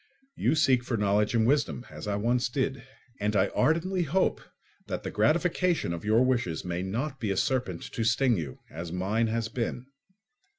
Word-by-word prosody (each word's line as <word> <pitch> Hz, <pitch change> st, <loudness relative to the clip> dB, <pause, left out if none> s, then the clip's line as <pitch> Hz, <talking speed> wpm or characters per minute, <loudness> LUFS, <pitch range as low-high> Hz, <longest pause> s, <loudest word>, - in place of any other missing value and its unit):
You -, -, +1 dB
seek 135 Hz, -5 st, +3 dB
for 120 Hz, -1 st, -2 dB
knowledge 105 Hz, +2 st, +2 dB
and 110 Hz, -1 st, +3 dB
wisdom, 130 Hz, -1 st, +1 dB
as -, -, -8 dB
I 100 Hz, -, 0 dB
once 120 Hz, +4 st, +1 dB
did; 130 Hz, 0 st, -1 dB, 0.4 s
and 105 Hz, +1 st, 0 dB
I 100 Hz, 0 st, +3 dB
ardently 180 Hz, +4 st, +1 dB
hope 175 Hz, +4 st, +1 dB, 0.5 s
that -, -, -4 dB
the -, -, -4 dB
gratification 170 Hz, -, +1 dB
of 85 Hz, -, -6 dB
your 110 Hz, +4 st, +4 dB
wishes 115 Hz, -12 st, 0 dB
may 90 Hz, 0 st, -2 dB
not 120 Hz, +9 st, -3 dB
be 110 Hz, -5 st, -2 dB
a 95 Hz, -, 0 dB
serpent 125 Hz, -, 0 dB
to 115 Hz, -, -1 dB
sting 120 Hz, +2 st, +3 dB
you, 75 Hz, -9 st, -4 dB
as 85 Hz, +2 st, -6 dB
mine 100 Hz, +6 st, 0 dB
has 115 Hz, 0 st, -1 dB
been. 120 Hz, +1 st, -3 dB
115 Hz, 180 wpm, -28 LUFS, 100-135 Hz, 0.5 s, your